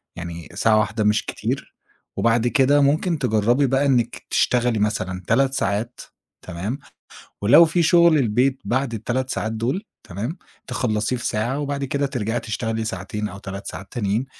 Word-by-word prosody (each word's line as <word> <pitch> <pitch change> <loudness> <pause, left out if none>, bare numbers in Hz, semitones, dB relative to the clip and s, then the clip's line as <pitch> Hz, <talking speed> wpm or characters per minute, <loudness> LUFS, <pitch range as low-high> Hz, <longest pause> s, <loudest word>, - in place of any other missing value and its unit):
يعني 85 -1 -7
ساعة 110 -1 +3
واحدة 110 +1 0
مش 105 +1 +2
كتير - - -4 0.4
وبعد 115 +1 +2
كده 145 +2 +4
ممكن 155 +4 +2
تجرّبي 120 +3 +2
بقي 135 +2 +2
إنِّك 125 -4 0
تشتغلي 120 -3 +2
مثلًا 95 -3 -1
3 135 +3 +2
ساعات 110 +1 -2 0.4
تمام، 100 +10 -4 0.7
ولو 145 +11 +8
في 170 +2 +1
شُغل 170 -1 +5
البيت 130 +3 +1
بعد 130 -1 -1
ال3 125 +4 -2
ساعات 110 +1 -2
دول 120 - -2 0.2
تمام، 110 - -5 0.3
تخلّصيه 110 +1 -1
في 120 - -5
ساعة 120 +6 -1
وبعد 140 -1 -2
كده 140 +1 -1
ترجعي 120 -3 -2
تشتغلي 115 0 -3
ساعتين 105 +1 -4
أو 100 - -9
3 100 0 -7
ساعات 100 - -8
تانيين 110 +2 -1
120 Hz, 155 wpm, -22 LUFS, 105-135 Hz, 0.7 s, ولو